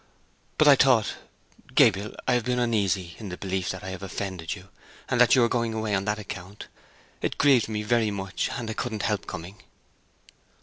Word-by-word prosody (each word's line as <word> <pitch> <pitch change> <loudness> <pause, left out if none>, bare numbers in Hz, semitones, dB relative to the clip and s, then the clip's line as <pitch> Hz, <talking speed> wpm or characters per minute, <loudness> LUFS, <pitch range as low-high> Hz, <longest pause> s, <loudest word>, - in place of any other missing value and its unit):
"But 155 - +5
I 145 - +9
thought—Gabriel, 110 -4 +1
I - - +3
have 120 -1 +2
been 125 +2 -1
uneasy 100 -7 0
in 105 - -7
the 90 - -6
belief 95 -1 -2
that 95 - -5
I 95 - -5
have 95 0 -7
offended 95 -2 -4
you, 95 -1 -14 0.4
and 125 - +2
that 125 - +6
you 125 - +5
are - - +4
going 115 -1 -1
away 110 -1 -2
on 95 0 0
that 105 0 0
account. 100 -1 -8 0.6
It - - -2
grieved 135 -6 +4
me 105 -1 -2
very 115 0 +2
much 95 -2 -3
and 120 - -4
I 110 - -3
couldn't 110 -2 -3
help 105 -3 -1
coming." 90 +5 -8
105 Hz, 190 wpm, -26 LUFS, 95-115 Hz, 0.6 s, I